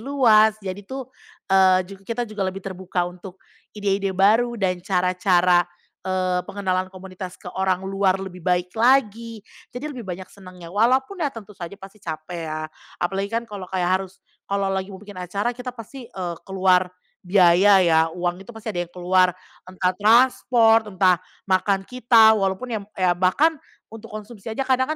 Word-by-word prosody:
luas, 225 -5 +4
jadi 190 +1 -5
tuh, 260 -1 -7 0.4
eee, 185 -1 +5
juga 195 +1 -13
kita 235 +1 -2
juga 210 -3 -3
lebih 190 0 -5
terbuka 185 -1 -3
untuk 180 +1 -9 0.4
ide-ide 195 -1 -1
baru 225 +5 +3
dan 185 -3 -1
cara-cara, 180 -1 +2 0.4
eee, 185 -1 -1
pengenalan 185 -2 -1
komunitas 185 -1 -9
ke - - -10
orang 190 0 0
luar 195 -1 +1
lebih 190 -1 -8
baik 180 0 0
lagi. 230 -2 +1 0.2
Jadi 285 +5 -6
lebih 240 -7 -9
banyak 185 +1 -5
senangnya, 185 -3 -12
walaupun 260 - +1
ya 295 - +1
tentu 225 -5 -11
saja 185 0 -8
pasti 195 +1 -14
capek 165 -1 -6
ya. 155 0 -4 0.3
Apalagi 195 +3 -2
kan 230 +2 -2
kalau 200 -5 -8
kayak 185 0 +1
harus 190 0 -9 0.3
kalau 200 -1 0
lagi 190 0 -2
mau 195 - -9
bikin 200 -2 -10
acara 200 +6 -2
kita 250 +1 -8
pasti, 245 +1 -9
eee, 180 -6 -5
keluar 185 -1 +3 0.3
biaya 185 +1 +5
ya, 160 -1 +4
uang 175 +2 -3
itu 225 +3 -12
pasti 220 -1 -5
ada 175 -1 -3
yang - - -31
keluar, 180 0 +2 0.3
entah 185 0 0
transport, 225 0 +4
entah 185 -2 +2 0.2
makan 195 0 +1
kita, 230 -2 +5
walaupun 195 +5 -1
ya, 220 - -1
m 200 - -14
ya 185 -2 +3
bahkan 185 - +3 0.4
untuk 225 0 -10
konsumsi 215 0 -9
aja 225 +5 -2
kadang 260 0 +1
195 Hz, 170 wpm, -23 LUFS, 185-220 Hz, 0.4 s, eee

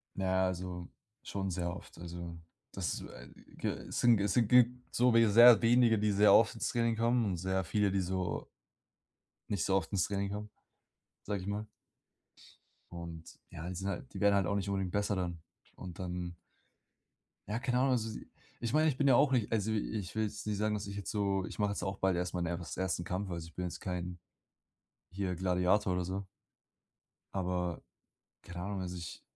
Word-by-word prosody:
Na 95 - -2
ja, 95 0 +2
also 90 -1 -4 0.4
schon 95 -1 -3
sehr 85 0 -2
oft, - - -12
also 85 0 -7 0.3
das, 90 -7 -3
äh, - - -10 0.3
g - - -2
äh, - - -4
sind 120 -3 +4
es 100 -1 +1
sind 120 -3 +3
ge 125 +1 +7 0.2
so 125 0 +3
we 115 -1 +6
sehr 120 +1 +9
wenige, 115 -1 +5
die 105 0 +2
sehr 105 +1 +6
oft 115 0 +5
ins 115 - -2
Training 115 -1 +1
kommen 115 +1 +2
und 95 -4 -1
sehr 95 +2 -1
viele, 105 +3 +1
die 100 - +1
so 90 -1 -2 1.0
nicht 100 -4 0
so 95 - +2
oft 90 -4 0
ins 100 -3 +2
Training 100 0 -2
haben, 105 +1 -5 0.7
sage 100 -1 -3
ich - - -8
mal. 105 +1 -3 1.3
Und 85 -1 -7 0.3
ja, 80 +2 -7
die 90 - -4
sind 95 +3 -4
halt 130 +7 -5
die - - -6
werden 100 -1 +4
halt 100 -3 +2
auch 100 - 0
nicht 100 0 -1
unbedingt 95 -2 -1
besser 100 +1 0
dann. 90 -2 -3 0.4
Und 90 -3 -9
dann 90 -1 -4 1.1
Ja, 105 +3 -2
keine 125 -1 0
Ahnung. 130 +1 +3
Also, 110 -3 -1 0.4
ich 115 -1 -3
meine, 155 +1 +4
ich 135 - -2
bin 140 - +2
ja 130 - +7
auch 140 +2 +4
nicht 120 -5 +1
also, 110 -1 +1
ich 105 -3 -3
will 110 - +1
jetzt 105 0 -5
nicht 105 -1 -1
sagen, 105 +1 +1
dass 105 -1 -3
ich 100 - -6
jetzt 100 -2 -4
so 100 -2 0
ich - - -9
mache 105 -1 +2
jetzt 100 - -4
auch 95 0 -3
bald 95 -1 +2
erst 90 0 -2
mal 90 - -1
mein 85 0 -1
ers 85 - -7
ersten 95 -2 -1
Kampf. 95 +3 -3
Also, 85 -2 -4
ich 85 - -16
bin 90 - -3
jetzt 90 - -5
kein 90 -1 -4 0.9
hier 95 0 -2
Gladiator 90 +2 +2
oder 90 0 -1
so. 95 +2 -4 1.1
Aber 90 -2 -2 0.6
keine 90 0 -8
Ahnung. 100 0 -3
Also, 90 -1 -4
ich 85 -2 -7
95 Hz, 205 wpm, -33 LUFS, 90-110 Hz, 1.3 s, sehr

